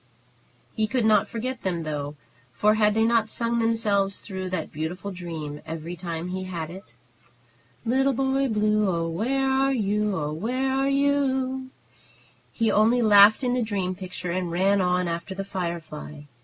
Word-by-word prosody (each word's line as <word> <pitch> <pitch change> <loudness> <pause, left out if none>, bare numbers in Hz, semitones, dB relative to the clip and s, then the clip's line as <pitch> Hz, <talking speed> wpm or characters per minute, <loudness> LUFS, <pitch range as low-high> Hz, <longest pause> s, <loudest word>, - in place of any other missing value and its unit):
He 220 -1 +1
could 250 -1 0
not 215 -1 +4
forget 245 +1 -4
them, 175 -3 -2
though, 145 -1 -4 0.4
for 210 - +3
had 210 -1 +3
they 220 - +3
not 225 -1 +2
sung 235 0 -1
themselves 210 -4 +1
through 190 -2 -5
that 180 -4 -3
beautiful 170 +6 -4
dream 160 -5 -6
every 165 +2 -6
time 170 0 -5
he 185 +1 -4
had 170 -3 -5
it? 180 -10 -12 0.9
"Little 265 +4 +2
Boy 270 +1 +1
Blue, 215 -2 +2
oh, 165 -2 -1
where 250 +11 0
are 265 +1 +2
you? 210 -3 0
O, 150 -1 -2
where 250 +10 -1
are 270 +1 +1
you 280 +1 +3
u 285 0 +2
u 260 - 0
u?" 260 0 -3 0.8
He 225 -2 +1
only 230 +4 +4
laughed 210 +3 +7
in 245 -1 +1
the 250 - +1
dream 200 -5 -1
picture 180 -1 -6
and 180 0 -2
ran 190 +3 +2
on 180 0 +1
after 170 +3 -4
the 195 +1 -4
firefly. 170 -5 -5
200 Hz, 175 wpm, -25 LUFS, 175-235 Hz, 0.9 s, laughed